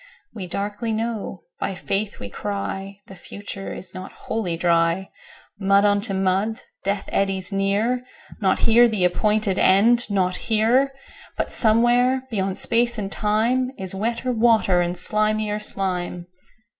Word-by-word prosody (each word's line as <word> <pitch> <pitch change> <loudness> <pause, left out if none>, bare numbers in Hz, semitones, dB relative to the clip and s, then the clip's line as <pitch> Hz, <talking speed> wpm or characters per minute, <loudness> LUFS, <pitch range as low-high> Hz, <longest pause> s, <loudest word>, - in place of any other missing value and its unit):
13We 190 -5 -6
darkly 205 +4 -3
know, 220 -3 -3 0.2
by 195 - -2
Faith 200 +3 -3
we 100 - -6
cry,14The 195 - -6
future 200 0 -8
is 185 - -7
not 185 +1 -8
Wholly 185 -7 -3
Dry.15Mud 180 +3 0
unto 205 0 +1
mud! 195 +5 0 0.2
Death 200 0 -2
eddies 195 -1 0
near 205 +6 0 0.4
16Not 190 -2 +2
here 235 +2 +6
the 210 -5 0
appointed 210 +2 +1
End, 230 +6 +4
not 185 -2 0
here!17But 255 +5 -1
somewhere, 245 +3 +4
beyond 195 -3 -1
Space 235 0 +1
and 195 -2 -4
Time.18Is 220 0 0
wetter 230 +5 -2
water, 225 -6 +3
slimier 210 +4 0
slime! 180 -4 -3
205 Hz, 120 wpm, -22 LUFS, 190-225 Hz, 0.4 s, here